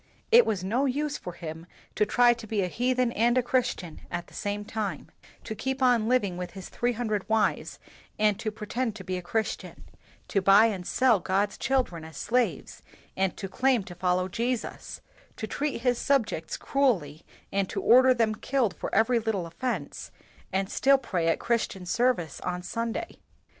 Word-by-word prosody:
It 475 +1 +7
was 195 -4 -1
no 240 +9 +1
use 290 +3 -1
for 180 - -7
him 160 0 -8 0.3
to 210 - +1
try 240 +2 +5
to 230 -2 -10
be 210 -2 0
a - - 0
heathen 250 +4 +1
and 235 +2 +2
a 255 - +3
Christian 245 -10 -1
at 175 - -4
the - - -20
same 205 0 -3
time, 215 -2 -4 0.3
to 220 - -5
keep 265 +5 -2
on 240 -4 +4
living 205 -8 +1
with 180 -1 -6
his 190 -2 -9
three 245 0 -1
hundred 215 -4 -2
wives 220 -1 +1 0.4
and 210 -2 +2
to 220 - -2
pretend 220 +2 -3
to 195 - -8
be 185 0 -3
a - - -4
Christian; 220 +5 -3 0.4
to 195 - +1
buy 195 +3 +7
and 195 -6 -2
sell 250 -6 +3
God's 195 +3 0
children 250 -12 -1
as 160 0 -10
slaves, 245 0 -1 0.3
and 190 -1 0
to 195 - -4
claim 255 +2 +2
to 180 - -10
follow 180 +1 0
Jesus; 235 +5 -3 0.4
to - - -3
treat 280 +3 -3
his 245 -1 +1
subjects 230 - 0
cruelly 185 - 0 0.3
and 195 -1 0
to - - -3
order 255 +2 +6
them 230 -3 +2
killed 240 -2 0
for - - -4
every 235 +2 +4
little 215 -5 -2
of 165 - -11
fense, 255 +4 -4 0.4
and 190 0 0
still 275 0 +4
to 265 - -15
pray 170 -3 0
at 165 - +2
Christian 225 -5 -1
service 190 - 0
on 180 0 -3
Sunday. 230 - -4
220 Hz, 185 wpm, -27 LUFS, 185-245 Hz, 0.4 s, It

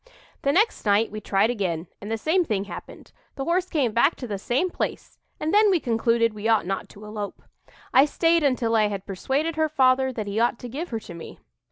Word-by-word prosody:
"The 280 - +2
next 420 +9 +2
night 210 +1 +2
we 215 0 -6
tried 200 +3 +2
again, 180 -8 -2 0.2
and 205 - -7
the 225 - 0
same 330 +10 +2
thing 210 - -1
happened 205 - -10 0.2
the 270 - -3
horse 360 +2 0
came 275 -8 +1
back 235 +9 +3
to 255 - -7
the 205 -4 -4
same 270 - 0
place; - - -4 0.2
and 315 +3 -1
then 420 0 +6
we 370 -3 +3
concluded 230 -2 +1
we 210 +1 -4
ought 220 -6 +3
not 195 +1 -3
to 210 +1 -13
elope. 210 -1 -6 0.5
I 265 +2 +7
stayed 330 +2 +2
until 245 -5 +1
I 215 -1 +4
had 200 -2 -5
persuaded 280 - -2
her 315 -1 +2
father 265 -2 +3
that 220 -4 -4
he 200 +2 -2
ought 235 0 +2
to 245 - -8
give 305 +9 -5
her 225 - -3
to 175 - -10
me. 170 - -10
235 Hz, 225 wpm, -24 LUFS, 210-300 Hz, 0.5 s, I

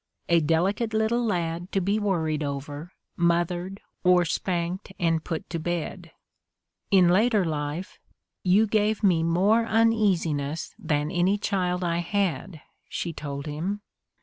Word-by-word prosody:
a 170 0 +5
delicate 190 +8 +1
little 220 +2 +1
lad 175 -4 -2
to 195 - +1
be 200 +3 0
worried 160 -7 0
over, 145 +3 -5 0.2
mothered, 175 +2 0 0.2
or 180 -1 +5
spanked 175 +3 -2
and 165 -3 +1
put 165 -2 -4
to 165 - -4
bed." 175 +1 -4 0.8
In 185 -3 +5
later 210 +2 +3
life, 150 +3 -4 0.4
"you 195 +4 +4
gave 215 0 +1
me 180 -5 +4
more 190 +8 +3
uneasi 215 -7 +3
ness 145 +2 -4
than 150 0 -1
any 185 +4 +2
child 185 -3 -1
I 170 -1 0
had," 175 -4 -2 0.3
she 170 - -3
told 140 -2 -6
him. 170 +8 -3
175 Hz, 135 wpm, -26 LUFS, 165-200 Hz, 0.8 s, a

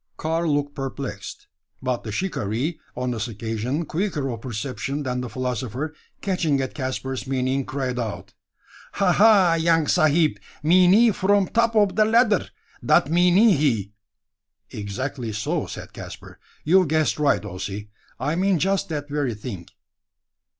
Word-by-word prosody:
Karl 165 0 0
looked 145 0 -1
perplexed; 135 -7 -6 0.3
but 125 -2 -2
the 110 - -5
shikaree, 140 - -2 0.2
on 125 0 -1
this 115 -1 -2
occasion 115 - -3
quicker 155 -6 -2
of 115 -2 -6
perception 130 +4 -4
than 125 -2 -2
the 125 - -5
philosopher, 130 +4 -3 0.3
catching 165 -7 0
at 130 -1 -3
Caspar's 130 -1 -4
meaning, 130 0 0
cried 130 -2 -3
out: 110 -4 -5 0.6
"Ha, 195 -3 +2
ha! 200 -3 +6
young 165 -1 +3
sahib 155 +2 +3 0.2
meanee 185 +8 +6
from 195 0 +2
top 230 0 +1
ob 205 -3 +4
da 215 - +4
ladder! 220 -1 +3 0.4
Dat 140 - +3
meanee 180 +5 +5
he." 115 -9 0 0.8
"Exactly 120 +3 -4
so," 105 0 -2
said - - -8
Caspar; - - -10 0.2
"you've 180 +3 +4
guessed 155 0 +1
right, 140 -9 +2
Ossy. 100 +2 -6 0.3
I 150 +4 -1
mean 190 +1 +2
just 195 +4 0
that 145 -2 -4
very 145 -5 -1
thing." 100 -5 -7
140 Hz, 140 wpm, -23 LUFS, 125-175 Hz, 0.8 s, ha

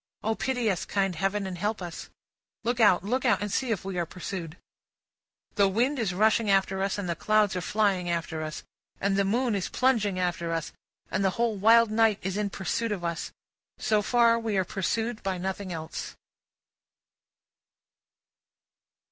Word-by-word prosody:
O 220 - +1
pity 245 0 -1
us, 180 - -2
kind 195 -3 0
Heaven, 195 +4 -1
and 185 -2 -5
help 210 +3 -1
us! 175 -3 -7 0.5
Look 240 +2 -1
out, 185 -6 +5
look 250 +6 -1
out, 235 -7 +3
and 205 0 -3
see 260 +2 0
if 205 -5 -2
we 190 -2 -3
are 170 - 0
pursued. 175 -2 -6 1.0
The 200 -1 +4
wind 245 +8 +1
is 215 -6 0
rushing 215 +3 +2
after 195 -1 +2
us, 195 +1 0
and 200 -3 -3
the 170 - -1
clouds 215 +2 +2
are 180 - -1
flying 195 -2 +1
after 165 -2 -2
us, 155 -1 -5 0.4
and 195 0 +1
the 200 - +3
moon 235 +4 +1
is 195 -3 -2
plunging 225 -7 +1
after 175 -2 -1
us, 165 -1 -3 0.4
and 195 - 0
the 190 - +4
whole 235 -2 +1
wild 225 +2 +5
night 220 -2 +3
is 190 0 -2
in 210 -1 -1
pursuit 205 +4 -2
of 190 -4 -3
us; 170 -1 -3 0.5
but, - - -8
so 215 -3 +3
far, 230 +1 +4
we 220 -3 -1
are 190 - +2
pursued 225 +5 -2
by 190 -1 -2
nothing 190 +1 -4
else. 160 -2 -6
200 Hz, 180 wpm, -27 LUFS, 185-225 Hz, 1.0 s, out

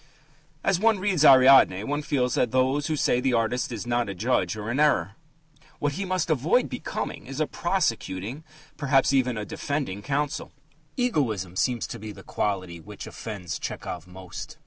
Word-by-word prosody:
As 195 -2 +2
one 225 +1 +4
reads 185 -5 +1
Ariadne, 130 -8 +7
one 145 +5 -2
feels 130 -4 0
that 125 - +2
those 130 +4 +1
who 155 - 0
say 125 -4 +2
the 130 -1 +1
artist 115 +3 0
is 115 -1 -5
not 120 -2 0
a 100 - -5
judge 105 -2 0
are 105 +2 -4
in 130 - -1
error. 140 - +3 0.7
What 145 - 0
he 195 +7 -4
must 185 -2 -1
avoid 155 - +2
becoming 250 - -5
is 135 +2 -6
a 155 - +2
prosecuting 130 - -2 0.3
perhaps 135 -1 +3
even 125 -3 +2
a 105 - -3
defending 135 -10 -3
counsel. 145 +5 -2 0.4
Egoism 115 - 0
seems 120 +4 0
to - - -7
be 105 +1 -7
the - - -12
quality 95 -4 -2
which 80 - -9
offends 100 -6 -6
Tchehov 90 -1 -5
most. 90 0 -9
130 Hz, 170 wpm, -26 LUFS, 105-150 Hz, 0.7 s, Ariadne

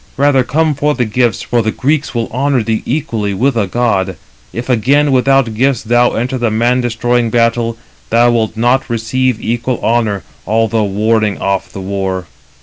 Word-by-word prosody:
Rather 140 -1 +3
come 155 +5 +1
for 145 +1 0
the 125 -1 0
gifts, 120 +2 0
for 120 -1 0
the 110 - -1
Greeks 140 +2 -1
will 115 -1 -1
honour 130 0 0
thee 110 0 -1
equally 110 -7 -2
with 130 +5 +1
a 105 -4 0
god. 95 -4 0 0.4
If 120 +1 -5
again 135 +4 +2
without 135 -2 +2
gifts 130 +2 +1
thou 120 +2 +2
enter 125 +3 -2
the 120 -1 +1
man 120 +3 +1
destroying 120 0 0
battle, 115 0 +1 0.3
thou 120 +1 +4
wilt 110 -2 -1
not 120 +4 +1
receive 120 +1 0
equal 120 +2 -2
honour, 110 -4 0 0.2
although 115 0 +1
warding 105 +1 0
off 95 -1 -2
the 95 - -7
war." 95 -1 -3
120 Hz, 170 wpm, -14 LUFS, 110-130 Hz, 0.4 s, thou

